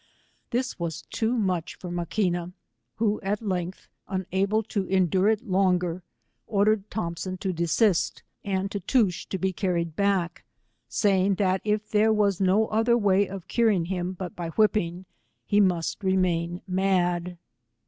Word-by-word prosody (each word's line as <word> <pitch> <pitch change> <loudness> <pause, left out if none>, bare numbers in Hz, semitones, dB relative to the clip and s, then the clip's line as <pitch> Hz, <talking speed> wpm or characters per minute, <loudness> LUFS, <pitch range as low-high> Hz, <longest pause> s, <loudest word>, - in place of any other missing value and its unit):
This 255 -1 -2
was 165 -2 -4
too 230 +2 0
much 185 -6 -1
for 180 - -7
Maquina, 175 0 -1 0.4
who, 215 -2 0
at 200 +2 -1
lengh, 185 -4 -2 0.3
unable 195 +3 0
to 200 -2 -2
eiodure 190 +2 +3
it 220 +2 -3
longer, 180 -2 +1 0.5
ordered 210 -1 +2
Thompson 185 -1 -4
to 190 0 -2
desist, 170 +3 +1 0.2
and 195 0 -1
Tootoosch 200 -1 0
to 190 - -2
be 190 0 -1
carried 170 -4 -1
back, 195 -3 0 0.5
saying 195 -1 +2
that 190 -1 +1
if 215 0 0
there 215 +1 +4
was 205 -3 +2
no 195 +4 +4
other 225 +2 +3
way 200 -2 +3
of 190 -2 -8
curing 215 -8 +2
him 180 0 -2
but 185 -1 -7
by 170 -2 -4
whipping, 185 -2 +1 0.4
he 205 - +2
must 185 0 +1
remain 180 -2 0
mad. 180 -2 0
190 Hz, 140 wpm, -26 LUFS, 175-210 Hz, 0.5 s, there